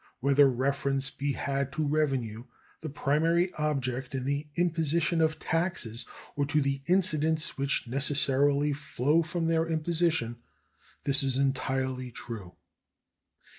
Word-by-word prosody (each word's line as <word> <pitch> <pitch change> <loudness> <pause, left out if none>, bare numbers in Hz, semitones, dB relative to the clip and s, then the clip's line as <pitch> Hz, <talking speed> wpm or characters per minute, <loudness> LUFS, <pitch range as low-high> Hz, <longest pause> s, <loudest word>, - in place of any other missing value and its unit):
Whether 140 +1 +5
reference 135 +1 0
be 140 0 -2
had 140 0 -2
to 155 +1 -1
revenue, 135 -7 -1 0.3
the 155 - -6
primary 165 +6 +1
object 135 -4 -2
in 130 -1 -3
the 140 +2 -1
imposition 170 0 +1
of 160 -1 +2
taxes, 165 -9 -2 0.3
or 145 -1 0
to 150 +1 +2
the 140 -1 0
incidents 160 -4 +2
which 140 0 0
necessarily 140 +2 +2
flow 145 +2 +1
from 165 +1 -2
their 165 0 +1
imposition, 160 -6 0 0.7
this 140 -1 +2
is 135 -2 0
entirely 130 -1 -1
true. 110 -7 -8
140 Hz, 125 wpm, -29 LUFS, 135-160 Hz, 0.7 s, Whether